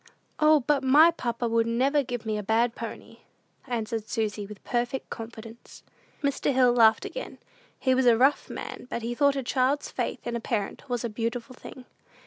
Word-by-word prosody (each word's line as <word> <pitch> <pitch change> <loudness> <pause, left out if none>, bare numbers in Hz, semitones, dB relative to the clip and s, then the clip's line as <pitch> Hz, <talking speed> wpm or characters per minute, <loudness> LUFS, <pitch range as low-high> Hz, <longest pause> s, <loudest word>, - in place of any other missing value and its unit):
"O, 305 -1 +5
but 280 +1 +1
my 300 +6 +7
papa 240 -6 -3
would 230 0 +1
never 265 +5 +2
give 245 -3 -5
me 215 -1 -1
a - - -2
bad 230 +3 +1
pony," - - -8 0.5
answered 225 -2 -3
Susy, 210 -2 -2
with 210 -1 -12
perfect 245 +2 -2
confidence. 225 0 -10 0.4
Mr. 280 0 0
Hill 250 -2 +4
laughed 225 -2 +5
again. - - -7 0.4
He 260 - +1
was 255 -1 +2
a 235 -2 +6
rough 270 +4 +2
man; - - -7
but 235 - -4
he 235 +1 -2
thought 280 +2 +3
a 270 - -2
child's 260 +3 0
faith - - -4
in 240 0 -3
a - - -1
parent 225 +2 -4
was 245 -1 -2
a - - 0
beautiful 230 +3 -4
thing. 255 0 -11
240 Hz, 185 wpm, -27 LUFS, 225-265 Hz, 0.5 s, my